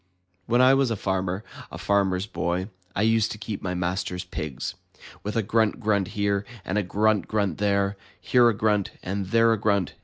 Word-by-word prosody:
When 120 +2 +3
I 130 +1 +7
was 135 -2 +3
a 115 - 0
farmer, 95 0 -2 0.3
a - - -7
Farmer's 95 -2 +1
Boy, 90 -1 -2 0.3
I 100 - +1
used 110 0 +3
to - - -9
keep 105 -1 -5
my 90 -1 -3
master's 90 +1 -2
pigs. 75 -7 -5 0.5
With 105 - -4
a 115 - +2
grunt 110 +2 +1
grunt 105 -4 +1
here, 100 -1 +1 0.2
and 100 +3 0
a - - +2
grunt 105 +1 +1
grunt 100 -6 -1
there, 100 -1 +1 0.2
Here 120 -2 +4
a - - +1
grunt, 105 -2 +1
and 95 +1 -3
there 115 +2 +4
a 110 - -1
grunt. 100 -3 +1
100 Hz, 190 wpm, -25 LUFS, 95-110 Hz, 0.5 s, I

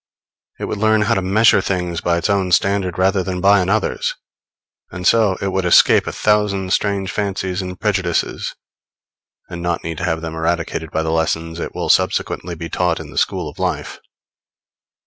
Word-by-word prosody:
It - - -3
would 105 - -4
learn 110 0 +3
how 105 - +2
to 95 - 0
measure 100 +2 +4
things 90 -3 -2
by 85 0 +1
its 85 - -1
own 100 -3 0
standard 95 -1 +1
rather 95 +1 +2
than 90 0 -3
by 100 +2 +5
another's; 95 +3 0 0.7
and 90 0 -7
so 105 -4 +3
it 100 - 0
would 95 0 -1
escape 90 - +5
a - - -2
thousand 100 -3 +1
strange 100 -2 0
fancies 95 -2 -2
and 90 -1 -7
prejudices, 95 -5 -1 0.9
and 85 - -7
not 85 -1 -2
need 80 -1 -5
to - - -2
have 80 -2 -1
them 80 -1 -5
eradicated 80 -1 -2
by 80 +2 -1
the 80 - -1
lessons 80 0 -1
it - - -5
will - - -3
subsequently 85 0 +1
be 85 +1 -6
taught 90 +2 0
in - - -9
the - - -13
school - - -1
of - - -10
life. - - -3
95 Hz, 185 wpm, -19 LUFS, 85-100 Hz, 0.9 s, by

